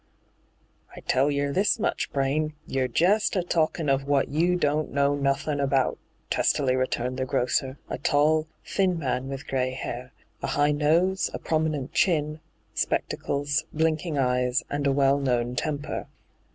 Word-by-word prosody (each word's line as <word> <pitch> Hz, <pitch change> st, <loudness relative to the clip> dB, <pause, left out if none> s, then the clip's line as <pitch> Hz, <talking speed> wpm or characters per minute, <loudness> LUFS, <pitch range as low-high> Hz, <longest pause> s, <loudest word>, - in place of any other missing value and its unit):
* -, -, -40 dB
' -, -, -23 dB
I -, -, -8 dB
tell 135 Hz, +3 st, +2 dB
yer 140 Hz, 0 st, 0 dB
this 205 Hz, -, +2 dB
much, 225 Hz, -, -1 dB
Braine: 150 Hz, +3 st, 0 dB
you're 130 Hz, -1 st, 0 dB
jest 200 Hz, +11 st, +2 dB
a 185 Hz, -, +1 dB
talkin' 160 Hz, -2 st, 0 dB
of 135 Hz, 0 st, +1 dB
wot 140 Hz, -1 st, +2 dB
you 170 Hz, +5 st, +2 dB
don't 150 Hz, -2 st, 0 dB
know 140 Hz, 0 st, +2 dB
nothin' 140 Hz, +1 st, 0 dB
about,' 135 Hz, -2 st, +1 dB, 0.3 s
testily 130 Hz, -3 st, +2 dB
returned 130 Hz, -1 st, -1 dB
the 130 Hz, -, -1 dB
grocer, 130 Hz, +2 st, 0 dB
a -, -, -4 dB
tall, 155 Hz, +2 st, +2 dB, 0.2 s
thin 185 Hz, -3 st, +1 dB
man 130 Hz, -3 st, -2 dB
with 135 Hz, 0 st, -6 dB
gray 130 Hz, -1 st, 0 dB
hair, 125 Hz, 0 st, -6 dB, 0.3 s
a -, -, -2 dB
high 145 Hz, +1 st, +2 dB
nose, 165 Hz, +6 st, +2 dB
a -, -, -1 dB
prominent 155 Hz, -4 st, -1 dB
chin, 155 Hz, -4 st, +1 dB, 0.3 s
spectacles, 145 Hz, +1 st, -1 dB
blinking 160 Hz, 0 st, 0 dB
eyes, 125 Hz, 0 st, +1 dB
and 145 Hz, 0 st, 0 dB
a -, -, +3 dB
well 140 Hz, 0 st, +3 dB
known 125 Hz, -2 st, 0 dB
temper. 145 Hz, +2 st, -3 dB
145 Hz, 160 wpm, -26 LUFS, 135-155 Hz, 0.3 s, a